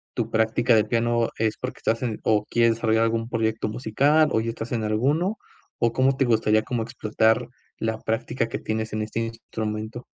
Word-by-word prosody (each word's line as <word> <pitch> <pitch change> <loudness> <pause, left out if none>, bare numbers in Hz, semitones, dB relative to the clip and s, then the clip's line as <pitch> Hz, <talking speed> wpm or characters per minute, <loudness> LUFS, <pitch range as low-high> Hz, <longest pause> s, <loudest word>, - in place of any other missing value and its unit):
tu 115 -2 -1
práctica 115 +2 +3
de 110 - +4
piano 115 0 +1
es 110 -1 0
porque, 125 - -6
¿estás 115 +2 0
en, 115 -4 -2
o 105 -1 +2
quieres 115 -1 +3
desarrollar 110 0 +2
algún 115 0 -1
proyecto 110 -2 -1
musical, 140 +8 +2
o - - +2
ya 115 - -3
estás 115 0 -6
en 115 -2 -1
alguno? 145 - +1 0.4
O, 120 -1 +2
¿cómo 130 +2 +3
te 135 - +2
gustaría 110 -2 +3
como 115 0 -2
explotar 110 0 +1 0.3
la 110 0 -1
práctica 115 +2 -2
que - - -4
tienes 110 0 -3
en 110 - -1
este 110 +1 -4
instrumento? 110 0 -5
115 Hz, 190 wpm, -24 LUFS, 110-120 Hz, 0.4 s, de